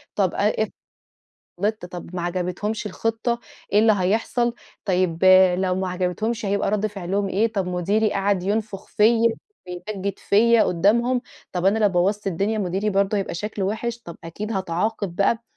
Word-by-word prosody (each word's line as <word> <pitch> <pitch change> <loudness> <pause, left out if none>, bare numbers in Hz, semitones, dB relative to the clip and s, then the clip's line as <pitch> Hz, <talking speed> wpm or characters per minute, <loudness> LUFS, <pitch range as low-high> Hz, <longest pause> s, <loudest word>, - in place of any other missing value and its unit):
طب 190 -4 +1
آآ، 205 +1 +2
افرض 215 - -5 0.9
غلطت 210 -3 -1
طب 175 0 -9
ما 175 - -2
عجبتهمش 180 +5 -2
الخطة، 225 +3 -2 0.3
إيه 205 - +5
اللي 220 0 +5
هيحصل، 225 +5 +1 0.3
طيب 185 -2 0 0.3
لو 185 -1 +1
ما 190 0 -2
عجبتهمش 190 +5 -2
هيبقى 200 0 0
رد 210 +1 +1
فعلهم 195 0 -2
إيه، 215 +4 +1
طب 195 -4 -1
مديري 200 +5 +1
قعد 195 -2 +1
ينفخ 205 0 -2
فيا 230 +2 +4 0.4
ويمجد 195 +2 -5
فيا 230 +3 +4
قدامهم، 235 +8 +2 0.3
طب 180 -1 -2
أنا 205 +3 +3
لو 210 -2 +4
بوظت 195 +3 0
الدنيا 200 +4 0
مديري 195 +2 -1
برضو 200 +1 +1
هيبقى 195 -3 -2
شكله 205 +2 -3
وحش، 230 +3 -3
طب 170 - -9
أكيد 210 +7 -5
هاتعاقب 190 0 -2
بقى. 225 +3 +2
200 Hz, 160 wpm, -23 LUFS, 185-220 Hz, 0.9 s, إيه